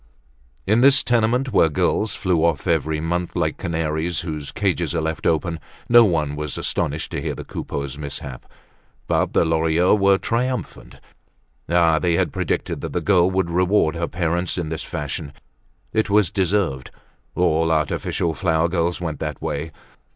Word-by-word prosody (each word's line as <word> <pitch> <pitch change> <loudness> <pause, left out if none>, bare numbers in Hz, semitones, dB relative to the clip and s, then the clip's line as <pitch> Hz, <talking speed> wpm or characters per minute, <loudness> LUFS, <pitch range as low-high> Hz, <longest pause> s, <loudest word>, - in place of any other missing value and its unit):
In 110 +4 +3
this 140 +1 +6
tenement, 120 +2 +1
where 80 - +5
girls 100 +7 0
flew 90 -4 0
off 80 -4 +1
every 80 -1 0
month 85 +2 -2
like 80 -3 -1
canaries 80 -1 -1
whose 75 -4 -5
cages 85 -5 -1
are 80 - 0
left 80 0 -2
open, 80 0 0 0.3
no 120 0 +7
one 75 -6 0
was 75 -1 -4
astonished 75 +3 -2
to - - -3
hear - - -2
of - - -11
the - - -6
Coupeaus' 70 0 -5
mishap. 70 -3 -7 0.6
But - - 0
the - - +3
Lorilleuxs 80 +4 +2
were 100 0 +5
triumphant. 125 +5 -3 0.7
Ah! 85 -2 +3
they 85 -1 +1
had - - 0
predicted - - -2
that - - -5
the - - 0
girl 95 -3 +3
would 95 -2 -1
reward 90 -2 +2
her 85 0 -2
parents 85 +1 -1
in 85 -3 -3
this 80 0 -4
fashion. 75 -2 -5 0.6
It 110 -1 +1
was 100 -3 +3
deserved; 95 - 0 0.5
all 80 -2 +2
artificial 80 +1 0
flower 80 -1 +1
girls 85 0 0
went 80 -5 -4
that - - -4
way. 75 +2 -4
85 Hz, 165 wpm, -22 LUFS, 80-95 Hz, 0.7 s, no